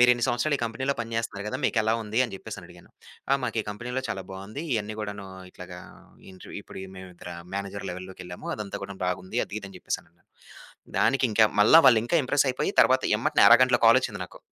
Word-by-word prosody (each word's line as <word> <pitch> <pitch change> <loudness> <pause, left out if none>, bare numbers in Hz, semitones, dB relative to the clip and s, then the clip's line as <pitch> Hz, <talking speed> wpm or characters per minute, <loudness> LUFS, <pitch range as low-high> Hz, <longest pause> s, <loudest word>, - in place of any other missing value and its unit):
మీరిన్ని 120 -1 +5
సంవత్సరాలు 125 +5 +1
ఈ - - -7
కంపెనీలో 130 +5 -2
పని 115 -1 -5
చేస్తున్నారు 115 -3 -3
కద, 130 - -3
మీకెలా 110 -1 +2
ఉంది 110 +1 -3
అని 115 - -9
చెప్పేసని 100 -3 -9
అడిగాను. 90 -1 -17 0.4
"ఆ! - - +7
మాకు 115 - -2
ఈ - - -20
కంపెనీలో 125 +5 -4
చాలా 95 -2 -3
బావుంది. 100 +9 -7
ఇవన్నీ 110 0 -3
కూడాను 100 -1 -6 0.2
ఇట్లాగా 90 0 -10 0.5
ఇంట్రవ్యూ 95 - -9
ఇప్పుడు - - -10 0.2
మేము 95 0 -10
ఇతర 90 - -9 0.2
మేనేజర్ 100 0 -5
లెవెలోకెళ్ళాము, 90 0 -8
అదంతా 105 -2 -5
కూడా 100 - -8
బాగుంది" 90 +1 -3
అది, - - -10
ఇది 100 - -8
అని - - -12
చెప్పేసన్నారు. 85 +1 -5 0.8
దానికి 135 -1 +3
ఇంకా 110 +1 +5 0.2
మళ్ళా 110 +10 +8
వాళ్ళు 115 -3 +7
ఇంకా 170 - +2
ఇంప్రెసైపోయి, 130 -1 +1
తరువాత - - +2
ఎమ్మటనే - - +3
అరగంటలో 125 0 +6
కాలొచ్చింది 115 -3 +4
నాకు. - - -14
105 Hz, 185 wpm, -26 LUFS, 95-120 Hz, 0.8 s, మళ్ళా